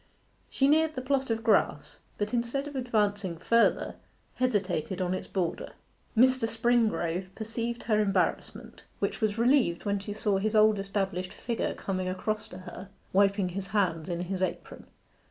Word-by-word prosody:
She 270 - +2
neared 315 +2 +3
the 255 - -3
plot 270 0 0
of 225 0 -1
grass, 220 -3 +1 0.2
but 205 +3 -2
instead 240 +4 -1
of 290 - -8
advancing 205 -7 0
further, 230 +7 +2 0.4
hesitated 190 -8 0
on 180 -1 0
its 185 - -4
border. 180 -4 -3 0.4
Mr. 255 -1 +4
Springrove 220 -7 +1
perceived 230 +2 -4
her 215 -2 +2
embarrassment, 195 -3 -1 0.2
which - - -2
was 215 -1 +1
relieved 235 -7 +3
when 200 -1 0
she 205 +1 -6
saw 205 -2 0
his 215 +2 -1
old 215 -1 +5
established 195 -2 -2
figure 235 -2 -3
coming 185 -1 -3
across 215 +4 -2
to 180 - -10
her, 185 +1 -9 0.2
wiping 195 -1 +3
his 195 +2 -4
hands 185 -5 0
in 175 0 -2
his 185 +1 -3
apron. 185 - -4
205 Hz, 155 wpm, -29 LUFS, 185-235 Hz, 0.4 s, old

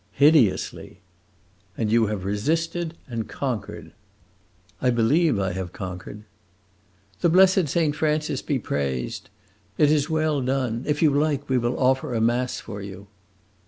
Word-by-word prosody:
"Hideously!" 140 -10 +2 0.8
"And 110 -2 -1
you 115 -1 +4
have 100 -3 -4
resisted 165 - -1
and 115 -3 -5
conquered!" 125 -7 -4 0.9
"I 125 - +2
believe 125 +5 +3
I 95 -1 0
have 90 -1 -5
conquered." 95 +2 -7 1.0
"The 170 - +3
blessed 185 0 +5
Saint 150 0 +1
Francis 150 -3 0
be 145 - -1
praised! 70 - -3 0.5
It 150 -1 +4
is 150 0 +1
well 155 -2 +1
done. 130 -2 -1
If 150 +1 0
you 155 - +5
like, 145 0 0
we 130 -1 +2
will 120 +1 -1
offer 130 -1 +1
a - - +1
mass 120 +2 0
for 105 -3 -8
you." 100 0 -9
130 Hz, 140 wpm, -24 LUFS, 105-150 Hz, 1.0 s, blessed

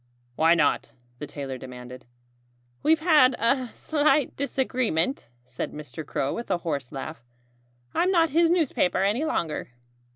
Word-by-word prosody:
"Why 165 +4 +4
not?" 150 -4 +1 0.3
the 150 - -6
tailor 135 -3 -6
demanded. 125 0 -10 0.7
"We've 315 +1 +3
had 300 -7 +5
a 255 +2 +2
slight 295 +2 +1
disagreement," 255 - 0 0.2
said 125 -1 -5
Mr. 150 -1 -7
Crow 140 -1 -2
with 235 - -6
a 185 - +2
hoarse 145 -7 -4
laugh. 140 -1 -7 0.7
"I'm 360 - +2
not 330 -4 +3
his 330 +2 +4
newspaper 290 - +1
any 215 +10 +1
longer." 160 - -2
190 Hz, 135 wpm, -26 LUFS, -, 0.7 s, had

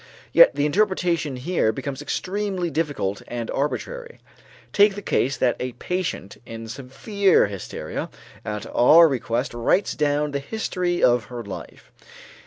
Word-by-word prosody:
Yet - - +7
the 145 - +1
interpretation 175 -4 +1
here 130 -3 0
becomes 135 +4 -5
extremely 190 +2 -2
difficult 145 -12 -2
and 120 -1 -4
arbitrary. 475 - -4 0.5
Take 205 -1 +5
the 205 - -6
case 135 -4 0
that 125 -2 +2
a 125 0 -4
patient 180 - -4
in 115 -1 -8
severe 190 - +1
hysteria 100 -3 -6 0.3
at 105 0 -5
our 165 +7 +7
request 125 -3 -2
writes 120 - +1
down 150 -1 0
the 140 - -2
history 180 +1 -2
of 120 -3 +4
her 120 +2 -7
life. 100 - -10
145 Hz, 135 wpm, -23 LUFS, 120-185 Hz, 0.5 s, Yet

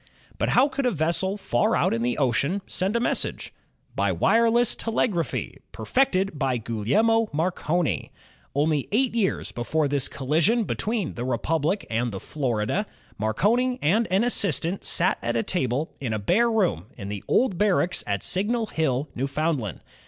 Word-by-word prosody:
But - - +1
how 260 +3 +6
could 275 -2 -1
a - - +4
vessel 180 +2 0
far 120 -11 +1
out - - +2
in 115 - -1
the 120 +1 0
ocean 140 - 0
send 190 +5 -1
a - - +3
message? 235 - -1 0.4
By - - +1
wireless 230 +1 +3
telegraphy, 195 - -2
perfected 190 - 0
by 135 -3 +1
Gugliehno 170 - +1
Marconi. 160 - -1 0.4
Only 150 -1 +1
eight 245 +3 +1
years 215 -5 0
before 145 +6 -1
this 140 -2 +1
collision 160 - +1
between 215 -3 -2
the 120 - -5
Republic 155 - -1
and 115 +1 -1
the 95 - -5
Florida, 130 - -2 0.3
Marconi 225 - +1
and 210 +10 +2
an 190 +4 +2
assistant 195 -6 0
sat 180 +1 +2
at 120 0 -2
a 115 - +1
table 145 -3 -1
in 120 -5 -2
a - - 0
bare 190 - +2
room 210 - 0
in 100 -3 -6
the 100 -1 -5
Old 210 -9 +2
Barracks 195 -3 +2
at 100 -2 -1
Signal 225 +5 +2
Hill, 155 -7 -1
Newfoundland. 135 - -2
165 Hz, 155 wpm, -25 LUFS, -, 0.4 s, how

